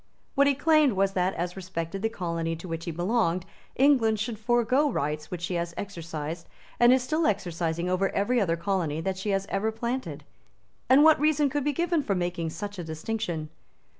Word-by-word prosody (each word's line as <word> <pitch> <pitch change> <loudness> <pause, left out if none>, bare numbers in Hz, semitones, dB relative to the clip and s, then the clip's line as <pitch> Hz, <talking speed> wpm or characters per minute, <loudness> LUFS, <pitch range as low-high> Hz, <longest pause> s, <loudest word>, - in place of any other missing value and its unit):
What 280 0 +4
he 280 - +3
claimed 305 -2 +4
was 195 0 +2
that, 185 0 0
as 175 +1 -3
respected 185 -1 -5
the 225 - +1
colony 170 -5 -3
to 165 +3 -9
which 165 -1 -5
he 170 - -3
belonged, 180 0 0 0.3
England 245 -6 +4
should 215 0 -3
forego 240 +5 +2
rights 150 +1 -2
which 175 -1 -6
she 180 - -2
has 170 0 -2
exercised 165 -4 -6 0.3
and 240 0 +7
is 260 -1 +4
still 310 +5 +1
exercising 175 -4 -1
over 185 +2 +1
every 235 +4 +1
other 170 -4 +1
colony 170 -4 -1
that 190 +2 -2
she 205 - -3
has 195 -1 0
ever 220 +3 0
planted. 225 - -4 0.7
And 270 +3 +7
what 315 0 +6
reason 300 -2 +2
could 290 0 -1
be 295 - +1
given 340 +2 0
for 205 -8 -1
making 175 -2 -2
such 200 +4 -6
a - - -3
distinction? 160 -1 -4
195 Hz, 195 wpm, -27 LUFS, 170-245 Hz, 0.7 s, and